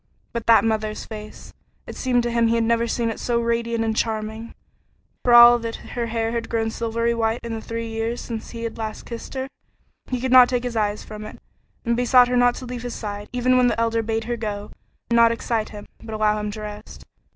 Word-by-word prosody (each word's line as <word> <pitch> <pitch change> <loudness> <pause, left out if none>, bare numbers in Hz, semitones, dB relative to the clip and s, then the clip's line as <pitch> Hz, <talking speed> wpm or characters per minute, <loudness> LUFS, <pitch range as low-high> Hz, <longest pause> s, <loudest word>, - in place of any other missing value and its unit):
But 235 -2 -4
that 225 -2 +6
mother's 215 -1 -1
face! 215 -1 -10 0.3
It - - -8
seemed 245 -2 +1
to 240 - -1
him 235 0 +2
he 230 - +2
had 230 - +2
never 235 +1 +1
seen 230 0 -1
it - - -7
so 240 -1 0
radiant 235 0 0
and 220 -1 -1
charming, 220 +1 -3 0.7
for 245 - +2
all 240 0 +9
that 230 0 -4 0.2
her 235 -1 -2
hair 225 0 -1
had 230 -1 -3
grown 225 -1 0
silvery 230 +1 -1
white 225 0 0
in 235 -1 -4
the 225 - -4
three 230 +1 -5
years 225 +1 -3
since 225 -2 -6
he 230 -1 -7
had 230 0 -5
last 220 -1 -5
kissed 235 +3 -8
her. 265 0 -3 0.6
He 255 - -2
could 260 +1 -2
not 255 -1 +8
take 250 -1 -1
his 245 -2 -4
eyes 210 -1 -1
from 215 0 -9
it, 215 - -9 0.5
and 235 0 +1
besought 245 +1 +5
her 250 - 0
not 245 0 +4
to 255 - -7
leave 245 -1 -6
his 245 0 -5
side, 205 -1 -6
even 250 +1 +2
when 250 -1 +4
the 235 -1 0
Elder 230 0 +1
bade 225 0 -2
her 240 +1 -3
go 210 -2 -5 0.4
and 235 - +4
not 230 0 +6
excite 230 -1 -2
him, 205 -1 -9 0.2
but 220 -1 -7
allow 215 0 +2
him 210 0 -3
to 215 +1 -7
rest. 210 0 -9
230 Hz, 235 wpm, -23 LUFS, 220-240 Hz, 0.7 s, all